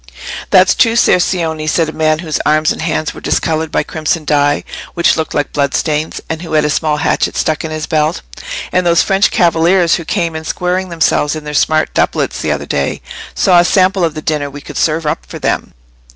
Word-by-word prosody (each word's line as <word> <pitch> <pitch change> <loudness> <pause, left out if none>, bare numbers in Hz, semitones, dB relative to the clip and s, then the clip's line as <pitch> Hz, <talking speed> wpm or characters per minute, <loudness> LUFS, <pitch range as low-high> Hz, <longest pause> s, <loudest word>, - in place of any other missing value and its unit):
"That's 185 0 +5
true, 230 0 +2
Ser 230 - +4
Cioni," 160 -4 -1
said 165 +1 +1
a - - -4
man 155 -1 +1
whose 155 -2 -1
arms 155 0 +2
and - - -4
hands 155 -1 -2
were - - -11
discoloured 160 0 -1
by - - +1
crimson 155 +1 -2
dye, 145 0 +2 0.3
which 170 - +3
looked 160 0 -3
like 145 -1 -1
blood 140 -1 0
stains, 155 0 -1
and 160 0 -4
who 165 -2 -7
had 155 -1 +3
a 150 - +1
small 150 -1 0
hatchet 150 - 0
stuck 155 0 0
in 160 - -4
his 155 0 -4
belt; 155 0 0 0.5
"and 180 - +1
those 170 -1 +3
French 195 +1 +2
cavaliers, 170 +1 +3
who 170 - -6
came 170 -1 -2
in 160 - -5
squaring 180 +3 -2
themselves 160 -2 +1
in 155 - -6
their 150 0 -6
smart 155 +1 +1
doublets - - 0
the - - -1
other - - -2
day, - - -2 0.4
saw 180 -3 +4
a - - +5
sample 185 +1 +2
of 160 -2 0
the 155 - -6
dinner 150 -2 -1
we 145 +1 -9
could - - -11
serve 160 0 0
up 150 +2 -2
for - - -8
them. - - -2
160 Hz, 220 wpm, -14 LUFS, 155-170 Hz, 0.5 s, That's